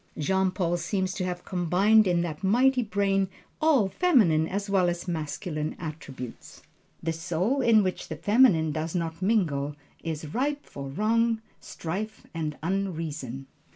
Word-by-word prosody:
Jean 190 +5 +2
Paul 175 -2 0
seems 185 +2 -1
to 185 - -2
have 180 -1 -4
combined 190 +4 +3
in 175 -1 +2
that 170 0 -4
mighty 250 +6 +4
brain 200 -3 +1 0.3
all 295 -10 +4
feminine 190 - +3
as 200 +3 -3
well 190 -3 +3
as 175 +1 -4
masculine 155 -1 -3
attributes. 145 -7 -8 0.4
The 165 0 0
soul 180 - 0
in 225 -4 +5
which 185 -1 -3
the 160 - -5
feminine 200 - +4
does 160 +3 -3
not 165 0 -2
mingle 155 -9 +1 0.3
is 155 -2 -5
ripe 285 +3 -1
for 140 -1 -7
wrong, 225 +8 +1 0.2
strife 210 +7 -5
and 155 -3 -3
unreason. 160 -8 -3
180 Hz, 145 wpm, -27 LUFS, 160-210 Hz, 0.4 s, in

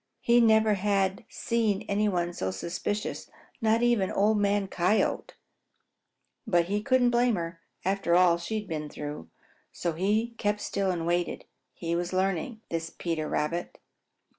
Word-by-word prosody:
He 240 0 +4
never 220 -1 +5
had 195 -1 0
seen 225 -4 0
any 210 +1 +1
one 175 -2 -1
so 95 - -2
suspicious, 170 - -4 0.3
not 225 +1 +3
even 235 -6 +3
Old 210 +1 +2
Man 200 -1 +1
Coyote. 185 +3 0 1.1
But 175 -1 +3
he 205 +3 -1
couldn't 255 0 +3
blame 240 -1 +3
her, 165 -1 -5 0.2
after 190 -3 +1
all 175 -1 +5
she 175 +6 -4
had 210 - -9
been 155 -2 -4
through. 145 - -7 0.4
So 170 -2 -2
he 210 +7 +1
kept 205 0 0
still 195 -1 -1
and 170 -3 -1
waited. 175 +1 -1 0.3
He 170 -1 -2
was 175 +1 -2
learning, 195 +4 -1
was 165 -1 -2
Peter 165 -3 -3
Rabbit. 170 +3 -2
190 Hz, 150 wpm, -28 LUFS, 170-215 Hz, 1.1 s, never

